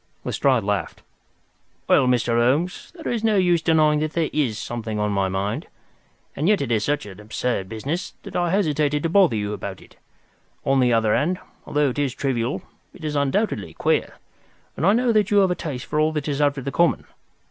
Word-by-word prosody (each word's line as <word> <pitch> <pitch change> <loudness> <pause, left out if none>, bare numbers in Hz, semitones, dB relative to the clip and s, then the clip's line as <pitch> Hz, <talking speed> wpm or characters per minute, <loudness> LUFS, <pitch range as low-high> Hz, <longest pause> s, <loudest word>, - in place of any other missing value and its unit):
Lestrade 130 -5 +1
laughed. 100 0 -2 0.8
"Well, 130 - +4
Mr. 125 -1 +2
Holmes, 135 +10 +1
there 320 -7 -3
is 230 -2 -2
no 220 -1 +3
use 175 -3 +3
denying 155 -2 +3
that 155 +1 -2
there 165 -2 0
is 130 -8 0
something 115 -2 -4
on 105 0 0
my 100 -1 +1
mind. 95 +2 -2 0.7
And 150 - -1
yet 210 -2 +4
it 130 -4 -2
is 110 -2 +2
such 145 -1 -1
an 100 -1 -10
absurd 105 -2 -3
business, 140 - -4
that - - -9
I 175 -1 +1
hesitated 150 -6 +1
to 165 - +1
bother 180 - +4
you 105 -1 -2
about 100 -1 -6
it. - - -19 0.7
On 135 0 +3
the 125 -1 +3
other 110 -2 +3
hand, 180 +5 +1 0.3
although 145 -1 +2
it 135 - -5
is 135 -3 -1
trivial, 130 -2 -1 0.3
it 170 - -13
is 150 -1 -2
undoubtedly 140 - 0
queer, - - 0 0.6
and 165 - 0
I 200 - +6
know 245 +1 +2
that 215 -2 +2
you 205 - +3
have 190 -2 +4
a - - +3
taste 140 -8 -5
for 150 - -1
all 155 +1 +3
that 150 -1 -3
is 145 -1 -1
out 145 -1 +2
of 135 - -6
the 140 - -2
common. 170 +3 +2
145 Hz, 210 wpm, -23 LUFS, 115-170 Hz, 0.8 s, I